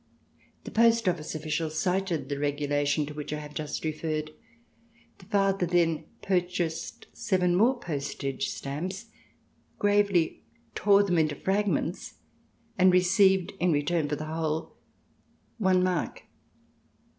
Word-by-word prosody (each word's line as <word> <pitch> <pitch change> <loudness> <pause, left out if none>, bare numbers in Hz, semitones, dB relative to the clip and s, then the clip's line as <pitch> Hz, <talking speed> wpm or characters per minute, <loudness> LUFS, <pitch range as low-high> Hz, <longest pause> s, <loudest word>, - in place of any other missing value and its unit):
The - - -8
post 230 -1 +4
office 165 -3 -1
official 155 +1 -2
cited 180 -1 -1
the 140 0 -3
regulation 145 +1 0
to 150 - -8
which 150 -1 -6
I 150 - -2
have 150 0 -8
just 155 +1 -4
referred. 155 0 -2 0.9
The - - -15
father 195 -3 +1
then 165 -2 +1 0.2
purchased 175 -3 -2
seven 180 -3 +1
more 240 +7 +3
postage 140 - -3
stamps, 190 +6 -5 0.7
gravely 205 -5 +2 0.3
tore 200 -1 +4
them 180 -4 +1
into 155 -2 +1
fragments, 200 +5 -1 0.6
and 185 0 +6
received 185 +1 +4
in 180 0 +2
return 150 +1 0
for 150 - 0
the 155 - -6
whole 160 0 -3 0.8
one 185 -3 +3
mark. 180 -4 -1
170 Hz, 120 wpm, -28 LUFS, 150-190 Hz, 0.9 s, and